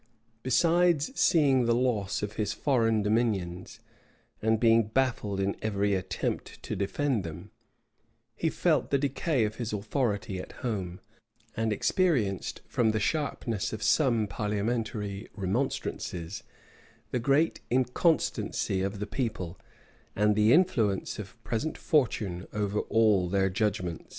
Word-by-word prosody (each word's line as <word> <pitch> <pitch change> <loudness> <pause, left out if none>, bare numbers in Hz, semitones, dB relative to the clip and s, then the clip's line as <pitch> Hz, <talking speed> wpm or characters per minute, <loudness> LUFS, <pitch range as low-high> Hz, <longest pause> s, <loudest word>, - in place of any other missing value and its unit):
Besides 165 - +3
seeing 140 - +4
the 115 0 +3
loss 110 -6 0
of 105 0 -3
his 105 -1 -1
foreign 115 -6 +2
dominions, 105 -5 -1 0.6
and 110 0 +2
being 115 -2 +4
baffled 110 -5 0
in 95 +1 0
every 100 -1 0
attempt 95 -1 -3
to - - -4
defend 115 +3 0
them, 80 -3 -8 0.8
he - - 0
felt - - +1
the 140 - +3
decay 140 -2 0
of 105 +1 -4
his 120 -2 -3
authority 105 -2 -1
at - - -8
home; 95 -6 -3 0.5
and 115 0 0
experienced, 115 - 0
from 115 -2 +1
the 110 - +1
sharpness 115 - -1
of 110 0 -5
some 120 -1 +3
parliamentary 105 0 -2
remonstrances, 95 -5 -3 0.7
the 125 - 0
great 140 +6 +2
inconstancy 125 - +1
of 100 +2 -2
the 105 - -3
people, 105 -6 -4 0.6
and 105 +1 +3
the 105 +2 +4
influence 115 - +2
of 100 +2 -8
present 135 +7 -2
fortune 105 - 0
over 105 0 -1
all 105 -5 +3
their 95 0 +1
judgments. 95 -4 -2
110 Hz, 125 wpm, -28 LUFS, 100-125 Hz, 0.8 s, seeing